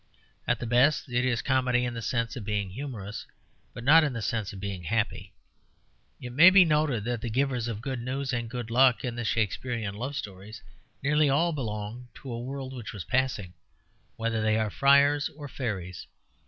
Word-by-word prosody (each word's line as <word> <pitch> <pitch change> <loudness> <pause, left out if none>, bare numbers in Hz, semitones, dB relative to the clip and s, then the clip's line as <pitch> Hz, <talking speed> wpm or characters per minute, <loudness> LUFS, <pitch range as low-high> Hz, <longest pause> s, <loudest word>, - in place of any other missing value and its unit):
At - - +1
the - - -4
best 125 +5 +3
it 120 0 +1
is 125 -3 0
comedy 130 -2 +2
in 120 - -3
the 115 - -5
sense 115 +1 -1
of 120 - -6
being 100 -2 -2
humorous, 110 -4 -6 0.4
but 120 - -9
not 155 +5 +7
in 145 -4 0
the 115 - -4
sense 110 -3 -2
of 100 - -9
being 95 -3 -5
happy. 105 -1 -2 0.8
It 125 - -7
may 160 +9 +8
be 185 -1 +7
noted 150 -8 +1
that 120 0 -2
the 120 - -3
givers 125 0 0
of 110 -2 -4
good 130 -2 -3
news 130 +2 -3
and 120 -2 -2
good 120 -2 -5
luck 125 +1 +4
in 120 -1 -3
the 120 - -3
Shakespearian 110 0 -1
love 125 +7 -5
stories 100 -3 -8 0.4
nearly 150 +1 +3
all 165 +5 +2
belong 115 -2 -5
to 130 -3 -8
a 115 - -4
world 130 +1 -6
which 120 -5 -7
was 100 - -6
passing, 110 - -1 0.6
whether 115 -1 -1
they 110 0 +2
are 110 -2 0
friars 140 +2 +4
or 145 -2 -7
fairies. 95 -10 -5
120 Hz, 195 wpm, -28 LUFS, 110-135 Hz, 0.8 s, may